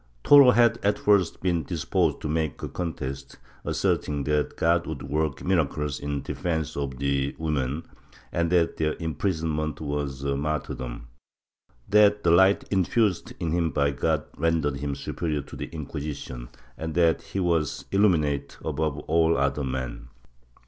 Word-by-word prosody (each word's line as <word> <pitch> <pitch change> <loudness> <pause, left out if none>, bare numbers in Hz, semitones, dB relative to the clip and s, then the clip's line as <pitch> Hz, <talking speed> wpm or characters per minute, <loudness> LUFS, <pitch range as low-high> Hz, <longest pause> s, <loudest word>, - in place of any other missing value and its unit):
Toro 140 -3 +8
had 120 -1 +4
at 100 0 +2
first 100 -5 +2
been 85 -3 +1
disposed 80 -1 -1
to - - -3
make 80 -1 -2
a - - -2
contest, 70 -5 -5 0.3
asserting 75 -1 0
that 75 +1 0
God 85 +1 +2
would 75 -3 -5
work 75 +1 -2
miracles 75 -5 0
in 70 -1 -3
defence 80 -3 -2
of 70 -2 -3
the 70 0 0
women, 75 -1 -2 0.5
and 85 0 0
that 85 -2 +2
their 75 -1 0
imprisonment 80 -3 -2
was 70 -2 -3
a 70 0 0
martyrdom; 70 -5 -3 0.8
that 105 0 +4
the 85 - +4
light 95 +3 +5
infused 95 0 +1
in 80 - -2
him 85 -1 +1
by 70 -1 +1
God 70 - 0
rendered 80 -3 +1
him 70 0 -3
superior 75 -1 -3
to - - -11
the - - -5
Inquisition, 70 -5 -6 0.3
and 80 -1 -4
that 85 -2 +3
he 100 - -5
was 85 -5 0
illuminated 75 -9 +2
above 75 -1 -1
all 80 +1 +2
other 70 +1 0
men. 65 -2 -4
75 Hz, 150 wpm, -26 LUFS, 70-85 Hz, 0.8 s, Toro